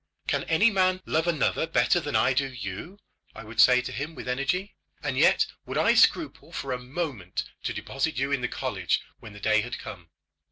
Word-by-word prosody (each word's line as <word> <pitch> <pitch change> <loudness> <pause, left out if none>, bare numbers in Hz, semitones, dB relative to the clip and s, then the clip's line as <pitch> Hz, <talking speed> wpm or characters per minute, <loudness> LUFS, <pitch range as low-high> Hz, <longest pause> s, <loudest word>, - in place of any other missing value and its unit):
"Can 140 -1 -1
any 200 +8 +4
man 185 -1 +2
love 160 +2 0
another 165 -1 +1
better 175 - +3
than 145 -3 -4
I 130 - +4
do 135 +1 0
you?" 115 - -7 0.4
I - - -8
would 110 +2 +1
say 125 0 +6
to - - -5
him 150 +4 -5
with - - -8
energy; 140 +10 -1 0.3
"and 145 -3 -1
yet - - +4 0.2
would - - -3
I - - +4
scruple - - +2
for 135 - -4
a 125 - -2
moment 125 - -4 0.2
to - - 0
deposit 135 +3 -3
you 135 +2 0
in 140 -2 +1
the 125 - 0
college - - -1 0.2
when 105 - -11
the 105 - -11
day 110 0 +3
had 120 +3 -5
come? 90 -4 -10
135 Hz, 205 wpm, -27 LUFS, 125-160 Hz, 0.4 s, say